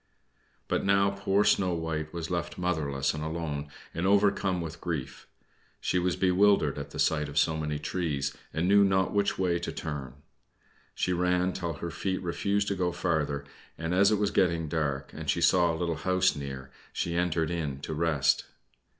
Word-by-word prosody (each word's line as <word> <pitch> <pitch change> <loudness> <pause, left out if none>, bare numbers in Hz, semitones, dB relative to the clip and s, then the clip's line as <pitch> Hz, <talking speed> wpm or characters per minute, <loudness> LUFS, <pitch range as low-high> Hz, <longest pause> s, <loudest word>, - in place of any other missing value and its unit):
But - - 0
now 100 0 +3
poor 100 0 +1
little - - +5
Snow 90 -2 0
White 80 -2 -3
was 85 0 -5
left 85 0 -2
motherless 75 -7 0
and 75 -1 -4
alone, 80 -2 -3 0.3
and 85 +3 -1
overcome 100 -2 +3
with 80 0 -6
grief, 70 -6 -4 0.5
she 90 - 0
was 90 0 0
bewildered 95 -6 +3
at 70 0 -6
the - - -9
sight 75 -2 +1
of 75 - -7
so 80 +1 +3
many 75 -1 -2
trees, 75 -3 -2 0.2
and 85 +3 0
knew 100 +1 +6
not 95 -1 +2
which 100 0 +1
way 90 -2 +1
to 85 - -4
turn. 70 -5 -5 0.8
She 90 - 0
ran 90 +1 +1
till 85 -2 -3
her 85 +3 -5
feet 95 +3 -2
refused 100 +3 0
to 100 - 0
go 90 -2 0
farther, 80 -5 -1 0.3
and 85 +1 -2
as 100 +2 +5
it 105 - +3
was 100 0 +1
getting 85 -4 +2
dark, 70 -3 -2
and - - -6
she - - +2
saw 85 -2 +4
a 80 - -3
little 85 -2 -1
house 95 +3 +2
near, 70 -2 -6 0.2
she 85 - -2
entered 85 -2 0
in 75 -6 -3
to 80 - -4
rest. 75 -3 +2
85 Hz, 185 wpm, -29 LUFS, 75-95 Hz, 0.8 s, knew